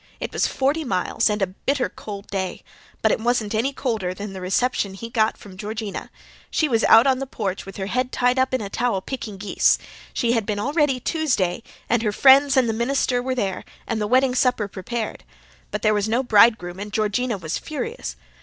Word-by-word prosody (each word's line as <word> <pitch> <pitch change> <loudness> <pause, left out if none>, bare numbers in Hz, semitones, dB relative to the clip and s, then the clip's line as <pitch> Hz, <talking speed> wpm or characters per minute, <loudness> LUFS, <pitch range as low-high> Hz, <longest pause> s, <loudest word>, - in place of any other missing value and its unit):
It - - -5
was - - +2
forty 285 +4 0
miles 200 - 0
and 210 -1 0
a 185 -1 -2
bitter 270 +5 0
cold 200 -1 -8
day. 190 -2 -3 0.4
But - - +4
it - - +1
wasn't 230 -2 0
any 230 +6 +1
colder 220 -10 -2
than 200 +1 -6
the 190 - -7
reception 195 +1 0
he 230 +4 -8
got 220 -2 +1
from 195 -2 -13
Georgina. 215 0 -5 0.4
She 310 - +1
was 230 -5 +1
out 225 +3 +7
in 265 -1 +3
the 270 - -4
porch, 195 -6 -4
with 195 - -9
her 190 - -3
head 250 +5 -1
tied 250 +1 +2
up 260 0 +2
in 260 -2 0
a 205 - -4
towel, 235 -6 0
picking 220 -4 -6
geese. 200 +1 +2 0.3
She 235 - 0
had 230 -2 +2
been 210 -2 -1
all 255 +8 -2
ready 295 -5 +2
Tuesday, 250 - 0 0.3
and 235 -1 +2
her 215 -2 0
friends 275 +4 +6
and 255 -2 +4
the 225 - 0
minister 245 +1 +1
were 260 +1 -2
there, 195 -6 -2 0.2
and 225 -2 -2
the 210 - 0
wedding 255 +2 +3
supper 250 -4 +2
prepared. 215 - -5 0.5
But - - -4
there 215 - +4
was 210 0 0
no 240 +4 +1
bridegroom 210 -6 +4
and 205 +1 -6
Georgina 215 +2 0
was 165 -3 -3
furious. 455 - -5
225 Hz, 210 wpm, -23 LUFS, 205-255 Hz, 0.5 s, out